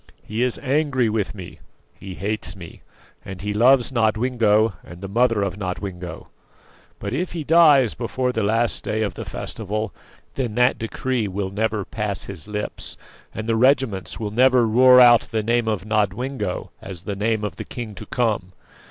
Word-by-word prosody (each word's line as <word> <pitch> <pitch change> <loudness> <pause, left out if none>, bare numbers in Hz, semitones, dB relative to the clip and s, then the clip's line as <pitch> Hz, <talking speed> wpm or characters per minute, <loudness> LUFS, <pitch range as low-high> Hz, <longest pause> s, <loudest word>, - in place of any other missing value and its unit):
He 110 +3 -3
is 125 -1 +1
angry 135 -3 +1
with 105 -1 -2
me; 90 -3 -10 0.4
he 95 -1 -8
hates 100 -3 -3
me, 85 -4 -11 0.4
and 95 -2 -8
he 105 0 -2
loves 120 +3 +4
Nodwengo 110 -2 +2
and 90 - -12
the 95 - -6
mother 115 0 +2
of 100 -1 -3
Nodwengo. 90 -3 -5 0.7
But - - -5
if 180 0 -2
he 165 -3 -4
dies 150 -7 +5
before 125 +2 -2
the 115 - -2
last 115 +3 0
day 110 0 -1
of 105 - -2
the - - -7
festival, 110 -1 -4 0.4
then 120 -5 -3
that 125 +1 +3
decree 115 0 -2
will 95 0 -3
never 105 -1 -1
pass 105 -3 -4
his 80 - -9
lips, 105 0 -5 0.3
and 110 +1 -6
the 115 - +2
regiments 125 -5 +1
will 105 -2 -3
never 125 +1 +4
roar 125 +3 +6
out 120 -1 +7
the 110 -2 -1
name 115 +1 +1
of 105 -3 -1
Nodwengo 110 +1 -2
as 95 -3 -8
the 100 +1 -4
name 110 +1 0
of 100 -7 -4
the - - -5
king 115 -4 -7
to 95 - -10
come. 105 -7 -1
110 Hz, 175 wpm, -22 LUFS, 100-125 Hz, 0.7 s, out